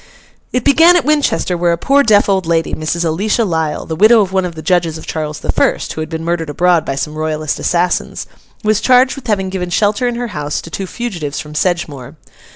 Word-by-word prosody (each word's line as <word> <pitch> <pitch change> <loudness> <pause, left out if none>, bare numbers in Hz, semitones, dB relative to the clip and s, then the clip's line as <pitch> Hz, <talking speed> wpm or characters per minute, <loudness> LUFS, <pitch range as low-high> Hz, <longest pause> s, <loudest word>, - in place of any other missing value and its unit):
It 250 - -1
began 325 +5 +5
at 350 - +2
Winchester, 295 -11 +1
where 175 0 +1
a - - -1
poor 275 +10 +3
deaf 210 -5 +4
old 190 -3 0
lady, 165 -1 0
Mrs. 170 +2 -2
Alicia 205 +8 0
Lisle, 160 -4 -2
the 160 - -4
widow 215 +6 +6
of 190 -2 -2
one 190 -1 +1
of 175 -2 -6
the 155 - -8
judges 165 -1 +1
of 160 - -10
Charles 155 -1 -4
the - - -1
First - - 0
(who 155 - -5
had 155 - -5
been 160 -1 -5
murdered 170 -2 -2
abroad 175 +2 +2
by 135 - -2
some 150 +2 -3
Royalist 155 -1 -2
assassins), 175 0 -1 0.4
was 215 -1 +1
charged 255 0 +4
with 270 -3 -10
having 195 -3 0
given 185 -2 -4
shelter 205 +6 +1
in 240 - -2
her 240 0 -4
house 150 -5 -3
to 165 - -12
two 195 +3 -4
fugitives 175 -12 -5
from 150 -1 -8
Sedgemoor. 150 -5 -2
175 Hz, 225 wpm, -15 LUFS, 160-215 Hz, 0.4 s, widow